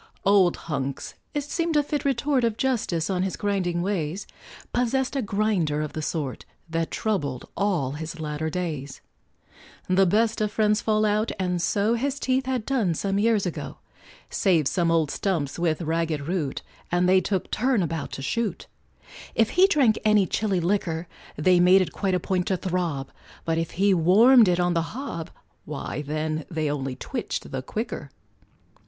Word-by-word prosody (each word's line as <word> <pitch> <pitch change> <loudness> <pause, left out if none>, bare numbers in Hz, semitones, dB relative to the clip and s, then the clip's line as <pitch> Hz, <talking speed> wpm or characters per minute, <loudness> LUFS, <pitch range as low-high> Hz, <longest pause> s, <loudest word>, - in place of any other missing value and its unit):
Old 195 -3 +4
Hunks 140 -4 -3 0.2
it 290 - 0
seemed 330 +2 -1
a 295 - +4
fit 295 0 -2
retort 270 0 +1
Of 230 -2 +1
justice 225 -12 0
on 185 -2 0
his 190 0 -1
grinding 180 -4 -1
ways 185 -2 -2 0.5
Possessed 250 +2 0
a 270 - +1
grinder 200 -8 0
of 150 - -5
the 155 - -3
sort, 150 -4 -3 0.2
That 165 0 -2
troubled 145 - -2
all 185 -10 0
his 160 +3 -6
latter 155 0 -3
days. 150 -6 -4 0.9
The 185 +1 +4
best 220 +4 +2
of 210 -1 0
friends 210 0 +2
fall 215 -1 +2
out, 215 +2 +1
and 180 -2 -1
so 205 +5 +1
His 275 +4 -1
teeth 260 -1 0
had 255 -4 -1
done 225 -11 +1
some 195 +4 -1
years 220 -2 +2
ago, 175 - -5 0.5
Save 170 -8 +2
some 170 0 +1
old 160 -3 +2
stumps 170 -7 -2
with 170 -1 0
ragged 160 -2 -1
root, 165 -6 -2 0.3
And 175 +1 +2
they 185 0 +5
took 190 0 -2
turn 245 -3 +2
about 165 -2 -3
to 135 - -5
shoot; 230 - -2 0.7
If 225 -1 +3
he 370 +2 +6
drank 275 - +3
any 215 -2 +4
chilly 195 0 0
liquor, 170 -2 -1 0.3
They 180 +4 +4
made 185 +2 +6
it - - -7
quite 190 -2 0
a - - +1
point 180 +1 -1
to 190 - +1
throb; 170 -7 -2 0.3
But 165 0 +1
if 165 - -2
he 200 +1 +4
warmed 215 +8 +6
it 180 -1 +2
on 175 0 +2
the 165 - +2 0.2
hob, 170 - -5 0.4
Why 150 0 -4
then 155 +1 -2
they 155 -3 -1
only 135 -3 -3
twitched - - -5
the - - -3
quicker. - - -5
185 Hz, 170 wpm, -25 LUFS, 160-215 Hz, 0.9 s, he